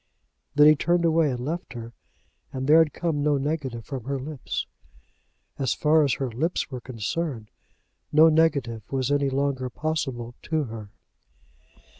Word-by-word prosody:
Then 150 +1 +7
he 155 0 +8
turned 170 +3 +1
away 165 -2 +3
and 125 -1 -3
left 170 +4 -4
her, 115 -1 -8 0.6
and 130 0 -4
there 155 +3 +7
had 160 -2 +4
come 160 -4 -2
no 145 0 +2
negative 135 -5 -3
from 130 -5 -6
her 140 0 -2
lips. 140 -1 -4 0.9
As 135 -3 0
far 155 +1 +4
as 140 - +2
her 130 -3 -3
lips 155 +10 -2
were 125 -2 -5
concerned 120 0 -4 0.6
no 155 +2 +7
negative 145 -8 +2
was 135 0 0
any 140 -1 +2
longer 135 -1 -1
possible 135 -5 -3
to 160 -2 -1
her. 110 -5 -8
140 Hz, 155 wpm, -25 LUFS, 125-155 Hz, 0.9 s, he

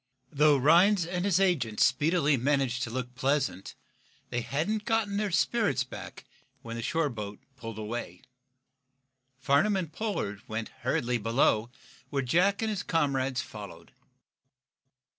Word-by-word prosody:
Though 150 0 +4
Rhinds 170 +7 +5
and 175 +2 -2
his 190 -3 +3
agent 150 - +1
speedily 150 +1 +3
managed 135 -1 0
to 120 - -2
look 125 +1 -4
pleasant, 135 -6 -1 0.6
they 120 - -1
hadn't 155 - -2
gotten 225 -3 0
their 210 0 0
spirits 195 - +1
back 125 - -10 0.4
when 115 0 -6
the 115 - -4
shore 160 +5 0
boat 105 -3 -6 0.2
pulled 115 -4 -8
away. 105 -5 -5 1.1
Farnum 140 +10 +2
and 170 -5 -3
Pollard 165 - -3
went 110 0 -4
hurriedly 120 0 0
below, 115 0 +2 0.4
where 140 -1 -1
Jack 185 - +2
and 220 - 0
his 205 -2 -2
comrades 135 -7 0
followed. 105 -4 -10
140 Hz, 135 wpm, -29 LUFS, 120-180 Hz, 1.1 s, Rhinds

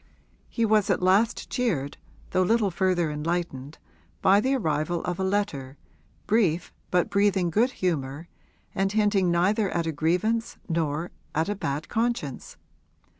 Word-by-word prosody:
He 230 - 0
was 215 -2 +3
at 185 -1 +1
last 200 +6 +2
cheered, 165 - -1 0.3
though 185 - +2
little 210 +1 +2
further 175 -3 +1
enlightened, 150 -2 -3 0.5
by 195 +2 +6
the 265 +4 +1
arrival 160 - -1
of 180 +1 -3
a - - 0
letter, 190 -9 -2 0.5
brief 190 -6 +1 0.2
but 180 -1 +1
breathing 200 -3 +2
good 230 +8 +3
humour 160 - -3 0.5
and 195 0 0
hinting 205 -3 +2
neither 190 +4 +2
at 170 -2 -1
a 165 - -1
grievance 180 +10 0
nor 160 0 -1 0.2
at 160 +4 +1
a 205 - -1
bad 150 -5 -3
conscience. 225 - -2
180 Hz, 140 wpm, -26 LUFS, 160-205 Hz, 0.5 s, by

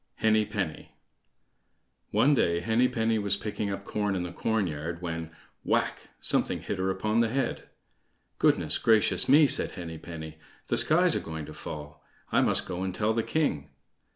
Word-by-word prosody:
Henny 110 -1 +2
Penny 100 -7 -5 1.1
One 145 +2 +3
day 85 -10 +2
Henny 110 +7 +2
penny 115 -2 0
was 100 -1 +1
picking 105 -1 -4
up 100 0 -6
corn 105 -2 -1
in 90 - -2
the 90 - -5
corn 110 +3 0
yard 80 +1 -5
when—whack!—something 80 -1 -2
hit 100 - -4
her 95 +1 0
upon 105 +4 0
the 115 -1 +2
head. 135 +3 -2 0.7
"Goodness - - +4
gracious 110 -2 +3
me!" 150 +3 +7
says - - +4
Henny 80 -2 -8
penny; 80 -1 -9 0.3
"the - - +1
sky's - - +4
a - - +1
going 80 -1 -6
to - - -10
fall; 75 -1 -9 0.3
I - - +4
must - - +1
go 90 -1 -5
and 95 -1 -3
tell 110 +1 +1
the 115 - +1
king." 140 - -1
100 Hz, 165 wpm, -28 LUFS, 85-110 Hz, 1.1 s, me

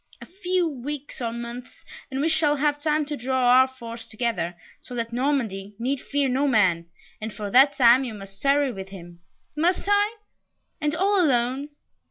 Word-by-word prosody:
A - - -10
few 365 -1 -1
weeks 285 -1 -6
or 230 -1 -1
months, 235 +1 -8 0.2
and 265 0 -2
we 310 - +2
shall 310 -2 +2
have 290 0 0
time 305 0 +1
to 295 +1 -4
draw 255 -1 +1
our 260 - +5
force 235 -3 -9
together, 220 -7 -2 0.3
so 250 - -9
that 230 -1 -3
Normandy 230 -7 -1
need 255 +4 -2
fear 285 -1 0
no 265 +3 +1
man, 185 -9 +2 0.3
and 220 +1 -4
for 205 -1 -6
that 270 +4 +6
time 245 +1 +6
you 235 -4 -5
must 195 -1 -11
tarry 280 -1 +3
with 195 -3 -8
him." 175 -3 -11 0.4
"Must 350 +5 +1
I 410 +2 +2 0.7
and 300 0 0
all 390 +2 +3
alone?" 260 0 +1
260 Hz, 180 wpm, -24 LUFS, 230-295 Hz, 0.7 s, that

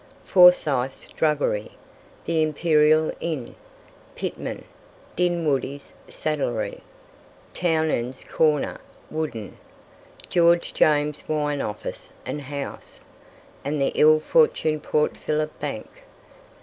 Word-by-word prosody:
Forsyth's 150 -8 +4
druggery, 145 -9 0 0.5
the 165 -1 +1
Imperial 155 0 +3
Inn, 155 -8 -4 0.6
Pittman, - - -5 0.5
Dinwoodie's 155 -5 -1
saddlery, 135 -8 -2 0.7
Townend's 155 -7 0
corner 155 -2 +1 0.3
(wooden), 145 -10 -4 0.7
George 170 0 +3
James's 150 -1 +1
wine 150 -2 0
office 105 0 -6
and 150 - -4
house, 140 0 -8 0.6
and 145 +1 -2
the 135 - +1
ill 155 0 +6
fortuned 155 - +2
Port 150 0 0
Phillip 155 0 -2
Bank. - - -4
150 Hz, 85 wpm, -24 LUFS, 140-160 Hz, 0.7 s, ill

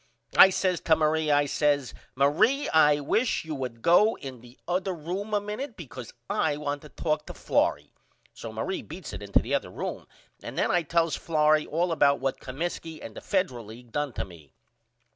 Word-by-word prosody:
I 190 - +10
says 185 -2 0
to 160 - +3
Marie 155 0 +1
I 145 0 +4
says 145 -2 +1 0.2
Marie 210 - +3
I 150 -2 +5
wish 220 - 0
you 160 - -4
would 125 -5 -5
go 205 +6 +5
in 130 -3 -9
the 120 +1 -16
other 185 +1 -1
room 180 +7 -5
a 210 - +2
minute 215 +5 -6
because 130 -7 -9 0.2
I 145 - 0
want 145 -1 -3
to 150 - -12
talk 155 0 -2
to - - -8
Florrie. - - 0 0.4
So 115 - -8
Marie 110 +12 -3
beats 165 - -9
it 100 - -6
into 100 -1 +1
the - - -4
other - - 0
room - - -5 0.3
and - - -8
then - - +2
I 175 - +3
tells 165 0 +1
Florrie 155 -1 +2
all 170 +3 0
about 140 -3 +3
what 135 0 -2
Comiskey 160 +3 -5
and - - -9
the - - -8
Federal 140 - -1
League 115 +2 -12
done 145 +1 -1
to - - -3
me. 80 -7 -16
155 Hz, 195 wpm, -27 LUFS, 135-175 Hz, 0.4 s, I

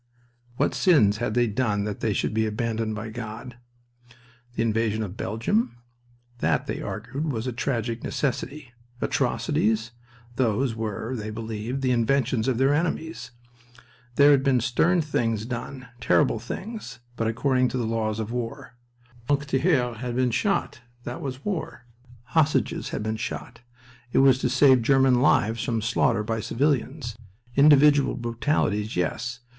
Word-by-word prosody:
What - - +1
sins 110 - +4
had 115 -2 -2
they 120 0 +4
done 105 -2 0
that 105 -1 -4
they 110 - 0
should 105 - -1
be 110 0 +1
abandoned 110 0 -2
by 110 +1 -5
God? 120 +2 -7 1.0
The 115 - +1
invasion 110 -1 0
of 100 -2 -6
Belgium? 120 - -1 0.6
That, - - +1
they - - -4
argued, 135 +8 -4
was 115 -2 -3
a 125 - -2
tragic 115 -2 -2
necessity. 140 -1 -3 0.3
Atrocities? 110 +2 0 0.5
Those 120 0 +1
were 110 +2 -4
(they 110 -2 -5
believed) 110 +4 -4
the 130 - +2
inventions 125 0 +1
of 130 -3 +1
their 135 +3 +3
enemies. 160 +1 -2 0.9
There 145 +2 +7
had 140 -2 +5
been 135 -2 +3
stern 160 +9 +2
things 115 -7 -1
done, 125 +1 -6
terrible 125 -1 +2
things, 190 - -7 0.2
but 115 -1 -1
according 130 +3 +1
to 130 - -3
the 120 - -1
laws 110 -1 -1
of 110 0 -4
war. 125 +3 -5 0.5
Francs 145 +1 +1
tireurs 130 -4 +1
had 120 +1 -4
been 125 -1 +2
shot. 200 - -1 0.2
That 120 +1 -6
was 135 -1 -6
war. 180 -10 -4 0.4
Hostages 155 +4 +1
had - - -4
been 110 0 -2
shot. 120 +1 -6 0.5
It - - +2
was 135 -1 +5
to 125 - 0
save 130 0 +5
German 130 0 +4
lives 115 -4 +2
from 115 -2 -1
slaughter 115 0 +1
by 115 +1 -2
civilians. 125 +2 -1 0.4
Individual 145 0 +5
brutalities, 115 -3 -1
yes. 120 +8 -2
120 Hz, 150 wpm, -25 LUFS, 110-135 Hz, 1.0 s, There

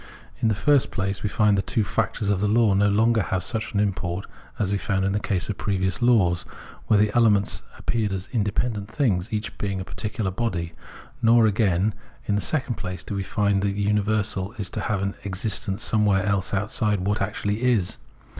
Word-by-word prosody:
In - - +1
the 110 - +2
fixst 140 +5 +3
place, 95 0 -2
we 105 - -1
find 105 -1 +3
that 100 - -1
the - - 0
two 110 - +3
factors 105 -1 -1
of 100 -1 0
the 105 - +2
law 110 -1 +4
no 100 +1 +3
longer 110 +2 +3
have 95 -1 -2
such 110 -1 -2
an - - +2
import 95 -2 -1 0.3
as 100 -2 0
we 100 - 0
found 95 -2 0
in 95 - +1
the 105 - 0
case 95 -4 -1
of 105 - -4
previous 95 +1 -1
laws, 100 -8 +3 0.5
where 110 - +4
the 105 +1 +2
elements 105 -4 +3 0.2
appeared 110 -3 -1
as 95 0 -4
independent 105 -1 -1
things, 110 -8 0
each 110 0 -3
being 100 -2 -2
a 95 - -5
particular 105 -2 -3
body; 90 -6 -2 0.5
nor, 115 0 +5
again, 100 -1 +2 0.3
in 105 - 0
the 100 - +1
second 135 -4 -1
place, 90 -1 -5
do - - -6
we 100 - -1
find 100 0 +1
that 100 0 0
the 105 - -2
universal 105 -1 0
is 95 -5 -4
to - - -3
have 100 -3 -1
its 100 0 -4
existence 105 +2 -1
somewhere 105 -3 +2
else 100 -3 0
outside 105 0 0
what 100 +3 -1
actually 105 +2 -2
is. 120 -8 +1
105 Hz, 205 wpm, -24 LUFS, 95-110 Hz, 0.5 s, nor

